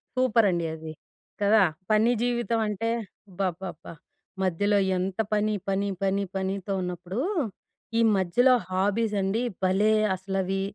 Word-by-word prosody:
Super 245 -3 +3
అండి 170 -2 0
అది. 160 0 -8 0.5
కదా! 210 +2 +5 0.3
పని 215 +3 +4
జీవితం 240 -2 0
అంటే 210 +2 -2 0.4
అబ్బబ్బబ్బా 180 -3 -4 0.5
మధ్యలో 205 +3 +2 0.2
ఎంత 185 +2 -3
పని, 210 0 +1 0.2
పని, 200 +1 0
పని, 195 +1 +1
పనితో 195 0 -2
ఉన్నప్పుడు, 180 +4 -4 0.8
ఈ - - +3 0.2
మధ్యలో 240 +8 +4 0.2
హాబీస్ 205 +3 0
అండి 195 +4 0 0.2
భలే 195 +4 +3 0.2
అసలవి 195 0 -2
195 Hz, 115 wpm, -26 LUFS, 185-215 Hz, 0.8 s, కదా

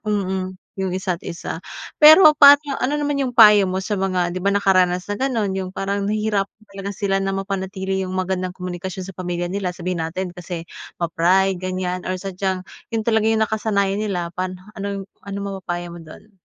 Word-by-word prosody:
mm, 185 -2 -2 0.2
'yong 190 -1 -1
isa't-isa. 175 -3 -4 0.4
Pero 310 +1 +10
paano 285 0 +7
ano 270 +4 0
naman 290 -1 -1
'yong 250 -2 -3
payo 210 -3 +8
mo 190 - -1
sa 210 - -2
mga 180 -2 0
'di 185 - -3
ba 200 - +2
nakaranas 185 -2 +2
na 205 - -2
gano'n, 235 -7 0
'yong 190 -1 -3
parang 200 +1 -2
nahihirapan 215 -1 -1
talaga 195 0 -5
sila 195 -1 0
na 195 - -1
mapanatili 190 0 -3
'yong 185 - -4
magandang 185 0 -1
komunikasyon 180 +1 -5
sa 195 - -8
pamilya 175 -1 -3
nila? 190 -1 -2
Sabihin 180 -1 -3
natin 175 +2 -4
kasi 175 -1 -6 0.3
ma-pride, 180 +3 +2
ganyan, 185 -1 -3
or 185 - 0
sadyang 190 0 -3 0.2
'yon 225 -1 -2
talaga 220 -1 +2
'yong 220 0 +3
nakasanayan 205 -2 0
nila. 180 -5 -2
Paano 185 +1 -4 0.2
ano 200 -1 -5 0.2
ano 200 0 -7
mapapayo 175 -3 -5
mo 175 - -9
doon? 165 +6 -14
190 Hz, 175 wpm, -21 LUFS, 180-205 Hz, 0.4 s, Pero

